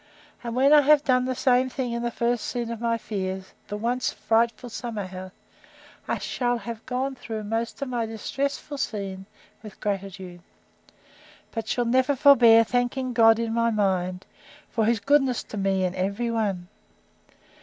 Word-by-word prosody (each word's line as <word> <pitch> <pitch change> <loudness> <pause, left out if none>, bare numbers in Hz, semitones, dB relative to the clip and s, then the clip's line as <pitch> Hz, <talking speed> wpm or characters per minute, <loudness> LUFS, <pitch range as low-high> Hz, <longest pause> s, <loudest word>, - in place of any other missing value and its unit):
—And 235 -1 -4
when 275 +3 +5
I 300 - +8
have 295 +1 +5
done 255 -2 +2
the 255 0 -2
same 255 +1 +2
in 240 -3 -2
the 240 - -1
first 235 0 -1
scene 240 -2 -3
of 230 -1 -6
my 230 -1 +1
fears, 190 -4 -5
the 205 - -4
once 240 +3 -1
frightful 230 +1 0
summer 220 -3 -4
house, 185 0 -8 0.8
I - - 0
shall 245 -1 -1
have 230 -1 -7
gone 260 +2 -1
through 225 -4 -6
most 225 +5 -3
of - - -4
my 235 -2 -1
distressful 275 +6 -4
scenes 195 -5 -4 0.3
with 215 -2 -12
gratitude; 190 -3 -5 1.1
but 225 -2 -5
shall 245 +2 0
never 260 +4 +2
forbear 245 -5 +7
thanking 245 +2 -1
God 225 -1 +6
in 230 -1 -2
my 230 0 +2
mind, 185 -4 0 0.5
for 225 -1 +1
his 230 0 +2
goodness 270 +1 +2
to 215 - -8
me 195 -1 +1
in 180 - -2
every 200 +6 -2
one. 200 -6 -1
230 Hz, 165 wpm, -25 LUFS, 205-250 Hz, 1.1 s, I